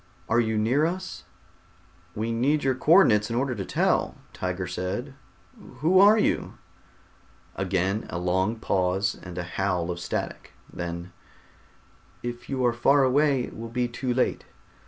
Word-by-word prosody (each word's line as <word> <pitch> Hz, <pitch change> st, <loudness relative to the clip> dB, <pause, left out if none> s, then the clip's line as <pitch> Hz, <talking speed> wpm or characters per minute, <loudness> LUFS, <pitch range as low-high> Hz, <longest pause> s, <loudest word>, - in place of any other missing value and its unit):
Are 115 Hz, -, +3 dB
you 110 Hz, -2 st, +1 dB
near 120 Hz, +8 st, +2 dB
to 170 Hz, -, +1 dB
us?" 185 Hz, 0 st, -8 dB, 0.9 s
"We 110 Hz, +2 st, -2 dB
need 140 Hz, +6 st, +1 dB
your 135 Hz, -1 st, +2 dB
co 145 Hz, +5 st, +2 dB
ordinates 105 Hz, -, +5 dB
in 115 Hz, -, -2 dB
order 130 Hz, +1 st, 0 dB
to 100 Hz, -5 st, -4 dB
tell," -, -, +1 dB, 0.2 s
Tiger 90 Hz, 0 st, -3 dB
said. 90 Hz, +10 st, -4 dB, 0.7 s
"Who 180 Hz, +5 st, +4 dB
are 205 Hz, +3 st, +7 dB
you?" 210 Hz, -, 0 dB, 1.0 s
Again 95 Hz, +2 st, -1 dB
a -, -, -4 dB
long 95 Hz, +5 st, 0 dB
pause 95 Hz, -2 st, 0 dB
and 90 Hz, -1 st, -9 dB
a 90 Hz, -, -2 dB
howl 90 Hz, -1 st, -1 dB
of 85 Hz, -, -5 dB
static. 85 Hz, -, -5 dB, 0.2 s
Then: 85 Hz, +1 st, -6 dB, 1.1 s
"If 120 Hz, 0 st, -6 dB
you 130 Hz, -2 st, 0 dB
are 120 Hz, -, +3 dB
far 135 Hz, +4 st, +4 dB
away 135 Hz, 0 st, +3 dB
it -, -, -8 dB
will 115 Hz, +1 st, -7 dB
be 125 Hz, +1 st, -1 dB
too 125 Hz, +1 st, -3 dB
late. 125 Hz, +1 st, 0 dB
115 Hz, 155 wpm, -26 LUFS, 95-130 Hz, 1.1 s, are